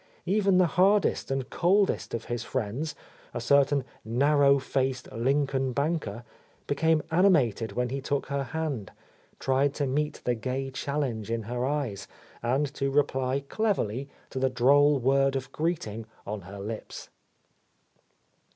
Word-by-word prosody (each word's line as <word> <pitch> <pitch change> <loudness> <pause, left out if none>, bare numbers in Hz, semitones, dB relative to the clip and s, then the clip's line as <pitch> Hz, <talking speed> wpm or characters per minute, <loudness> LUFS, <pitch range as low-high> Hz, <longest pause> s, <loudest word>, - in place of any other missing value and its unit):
Even 195 0 +3
the 185 - +5 0.2
hardest 200 +1 +3
and 135 -1 -2
coldest 190 - +2
of 115 - -5
his 120 -1 -3
friends, 130 +6 -3 0.4
a - - -1
certain 140 +2 +3 0.2
narrow 140 +4 +4
faced 130 -1 -2
Lincoln 135 +2 0
banker, 140 -6 -1 0.4
became 160 +2 +2
animated 140 - +3
when 125 +2 -1
he 135 +2 -3
took 140 0 -1
her 140 -1 -2
hand, 145 -8 -3 0.5
tried 135 +1 +1
to 145 - 0
meet 150 +3 -1
the 125 - +1
gay 130 +4 -3
challenge 130 -6 -2
in 115 -1 -1
her 120 +3 -2
eyes 135 -9 -2 0.3
and 135 +4 0
to 140 -2 -1
reply 135 -1 +1
cleverly 140 - -1 0.2
to 130 - -3
the 130 0 +2
droll 140 +4 +4
word 135 +1 +2
of 135 0 -4
greeting 115 -10 -2 0.2
on 105 0 -4
her 95 +3 -10
lips. 105 +3 -7
135 Hz, 140 wpm, -28 LUFS, 120-145 Hz, 0.5 s, the